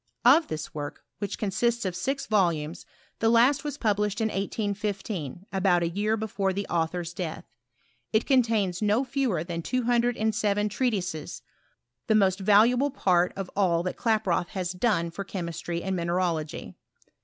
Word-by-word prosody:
Of 295 Hz, +7 st, +6 dB
this 155 Hz, 0 st, -5 dB
work, 145 Hz, -1 st, -6 dB, 0.2 s
which 205 Hz, -2 st, -3 dB
con 205 Hz, -3 st, -2 dB
sists 235 Hz, +2 st, 0 dB
of 185 Hz, -2 st, -2 dB
six 270 Hz, +10 st, -2 dB
volumes, 170 Hz, -6 st, 0 dB, 0.3 s
the 225 Hz, -, +3 dB
last 245 Hz, +6 st, +4 dB
was 295 Hz, -1 st, -4 dB
published 210 Hz, -2 st, 0 dB
in 220 Hz, -1 st, +1 dB
1815, 200 Hz, -, -3 dB
about 185 Hz, -2 st, +3 dB
a 170 Hz, -, 0 dB
year 210 Hz, +5 st, 0 dB
before 200 Hz, -3 st, -1 dB
the 200 Hz, +1 st, -3 dB
author's 170 Hz, +1 st, -1 dB
death. 170 Hz, -3 st, -5 dB, 0.7 s
It 220 Hz, -, +2 dB
contains 225 Hz, -9 st, +2 dB
no 210 Hz, +4 st, +2 dB
fewer 255 Hz, -, -1 dB
than 170 Hz, -1 st, -4 dB
two 255 Hz, +8 st, -1 dB
hundred 240 Hz, 0 st, +2 dB
and 220 Hz, 0 st, +1 dB
seven 210 Hz, -1 st, +1 dB
treatises, 190 Hz, -, -2 dB, 0.6 s
the 220 Hz, -, +3 dB
most 195 Hz, -2 st, +3 dB
valuable 225 Hz, +7 st, +4 dB
part 180 Hz, -9 st, +2 dB
of 195 Hz, -2 st, -5 dB
all 175 Hz, -4 st, +2 dB
that 180 Hz, -, -3 dB
Klaproth 210 Hz, -6 st, +1 dB
had 185 Hz, -3 st, -3 dB
done 170 Hz, -8 st, +1 dB
for 200 Hz, -, -5 dB
chemistry 170 Hz, -2 st, -4 dB
and 190 Hz, 0 st, -1 dB
mineralogy. 170 Hz, -3 st, -2 dB
200 Hz, 160 wpm, -27 LUFS, 175-225 Hz, 0.7 s, Of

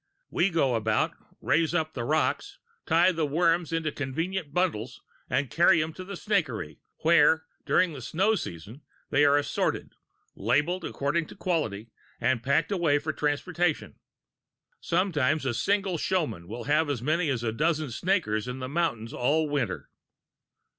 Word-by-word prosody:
"We 175 Hz, +3 st, +2 dB
go 160 Hz, -7 st, +1 dB
about, 110 Hz, -1 st, +1 dB, 0.3 s
raise 165 Hz, +1 st, +1 dB
up 160 Hz, -2 st, 0 dB
the 120 Hz, -, -4 dB
rocks, 155 Hz, -, 0 dB, 0.3 s
tie 170 Hz, +3 st, +5 dB
the 160 Hz, -3 st, -1 dB
worms 165 Hz, +2 st, +1 dB
into 165 Hz, -2 st, -1 dB
convenient 160 Hz, +5 st, -3 dB
bundles 130 Hz, -10 st, -1 dB, 0.3 s
and 130 Hz, -1 st, 0 dB
carry 170 Hz, 0 st, +5 dB
them 155 Hz, +1 st, -2 dB
to 185 Hz, -, -8 dB
the 195 Hz, +2 st, -7 dB
snakery, 125 Hz, -, -1 dB, 0.2 s
where, 160 Hz, -1 st, +5 dB, 0.2 s
during 180 Hz, -3 st, +3 dB
the 135 Hz, -, -8 dB
snow 190 Hz, -, +1 dB
season, 105 Hz, -, -6 dB, 0.3 s
they 145 Hz, -, +4 dB
are 145 Hz, 0 st, +5 dB
assorted, 145 Hz, -, -1 dB, 0.4 s
labelled 150 Hz, -, 0 dB
according 150 Hz, +4 st, -1 dB
to -, -, -12 dB
quality, 115 Hz, -, -2 dB, 0.3 s
and 120 Hz, -2 st, +1 dB
packed 140 Hz, +9 st, +1 dB
away 170 Hz, -7 st, +2 dB
for 155 Hz, +2 st, -3 dB
transportation. 155 Hz, +3 st, -1 dB, 0.8 s
Sometimes 155 Hz, -5 st, +1 dB
a 130 Hz, -, 0 dB
single 195 Hz, -, 0 dB
showman 155 Hz, -, -1 dB
will 115 Hz, +4 st, -6 dB
have 150 Hz, +2 st, +2 dB
as 125 Hz, -5 st, -2 dB
many 155 Hz, +3 st, +1 dB
as 120 Hz, -4 st, -1 dB
a 115 Hz, -, 0 dB
dozen 155 Hz, +2 st, 0 dB
snakers 125 Hz, -, 0 dB
in 125 Hz, +1 st, -4 dB
the 130 Hz, -1 st, -5 dB
mountains 130 Hz, -7 st, -2 dB
all 150 Hz, +5 st, +1 dB
winter. 110 Hz, -, -2 dB
155 Hz, 155 wpm, -27 LUFS, 130-170 Hz, 0.8 s, tie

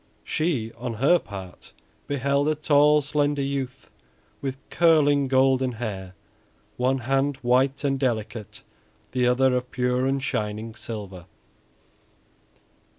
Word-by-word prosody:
She 140 Hz, -9 st, -1 dB
on 120 Hz, -1 st, -4 dB
her 140 Hz, +10 st, +4 dB
part 95 Hz, -3 st, -10 dB, 0.3 s
beheld 140 Hz, +1 st, +1 dB
a 155 Hz, -, +2 dB
tall, 150 Hz, 0 st, +4 dB
slender 145 Hz, 0 st, 0 dB
youth 135 Hz, -2 st, -4 dB, 0.5 s
with 135 Hz, -2 st, -3 dB
curling, 145 Hz, -4 st, +4 dB
golden 130 Hz, -1 st, +3 dB
hair, 95 Hz, -5 st, -6 dB, 0.6 s
one 130 Hz, +2 st, +1 dB
hand 135 Hz, +3 st, 0 dB
white 130 Hz, +3 st, +2 dB
and 135 Hz, -1 st, 0 dB
delicate, 110 Hz, -4 st, -3 dB, 0.5 s
the 125 Hz, -1 st, +1 dB
other 125 Hz, +1 st, +3 dB
of 125 Hz, 0 st, -2 dB
pure 125 Hz, 0 st, 0 dB
and 135 Hz, +1 st, +1 dB
shining 110 Hz, -1 st, -3 dB
silver. 100 Hz, -6 st, -8 dB
130 Hz, 115 wpm, -25 LUFS, 115-140 Hz, 0.6 s, her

